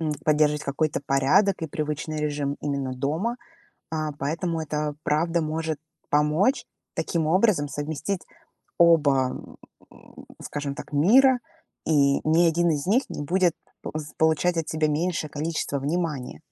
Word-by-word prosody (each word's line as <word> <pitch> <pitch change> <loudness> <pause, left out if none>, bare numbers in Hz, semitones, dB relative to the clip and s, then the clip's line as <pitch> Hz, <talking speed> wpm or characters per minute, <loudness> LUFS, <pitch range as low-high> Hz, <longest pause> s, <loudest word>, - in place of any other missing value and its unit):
м, 155 -2 -1
поддерживать 150 -1 +3
какой-то 145 +2 -1
порядок 165 +9 +3
и - - -1
привычный 155 +1 -3
режим 145 -2 -2
именно 140 -3 -2
дома. 160 - -1 0.5
А, 155 -2 -2
поэтому 160 +4 -2
это, 150 -1 -2
правда, 165 +3 +1
может 160 0 -2 0.3
помочь 150 - +2 0.3
таким 165 -2 -1
образом 180 -3 +3
совместить 155 +6 -3 0.6
оба, 145 -6 +4 0.6
м, - - -15 0.2
скажем 145 -1 -4
так, 150 - -10
мира, 250 - +5 0.5
и 140 -3 +3
ни 165 +2 +5
один 170 +1 +2
из 150 +1 -1
них 245 +7 +3
не - - -5
будет 180 +3 +2 0.3
п - - -6
з 150 0 -9
получать 160 +2 +2
от 160 - -2
себя 155 -1 +1
меньшее 155 +1 -1
количество 150 -1 -2
внимания. 150 -3 -2
155 Hz, 140 wpm, -25 LUFS, 145-170 Hz, 0.6 s, мира